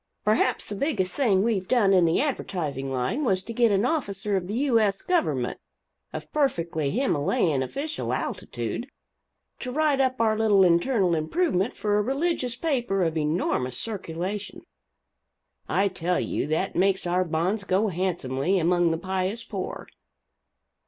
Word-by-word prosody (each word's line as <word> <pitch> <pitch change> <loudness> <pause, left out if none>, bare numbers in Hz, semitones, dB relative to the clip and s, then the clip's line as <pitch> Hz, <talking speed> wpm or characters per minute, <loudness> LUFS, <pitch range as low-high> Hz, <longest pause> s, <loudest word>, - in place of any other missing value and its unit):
Perhaps 215 +1 +2
the 205 - -5
biggest 195 - -1
thing 205 -9 +2
we've 205 -5 0
done 210 -5 +3
in 180 -2 +5
the 165 - +2
advertising 155 - -2
line 130 - -1
was 190 -7 +1
to 230 - -7
get 235 -1 +3
an 200 +3 +2
officer 205 -10 -1
of 180 -2 -1
the 205 - -3
U. 255 -2 +3
S. 200 -3 0
government, 355 -2 0 0.5
of - - -8
perfectly 170 - 0
Himmalayan 155 - +1
official 280 - -3
altitude, - - -3 0.7
to 250 - -5
write 295 -1 +2
up 260 -1 0
our 220 -1 +3
little 215 -3 +4
internal 180 +2 +3
improvement 190 - 0
for 210 -1 +1
a - - +3
religious 265 0 -1
paper 240 - 0
of 165 -1 0
enormous 150 -5 -1
circulation 205 - -5 1.1
I 200 - +2
tell 180 -1 -1
you - - -2
that 160 +5 -1
makes 190 0 +2
our 180 +1 +2
bonds 180 +5 -1
go 200 +2 +1
handsomely 175 -2 -1
among 175 0 +3
the 165 - 0
pious 190 +5 -2
poor. 200 -5 -6
195 Hz, 150 wpm, -26 LUFS, 175-235 Hz, 1.1 s, in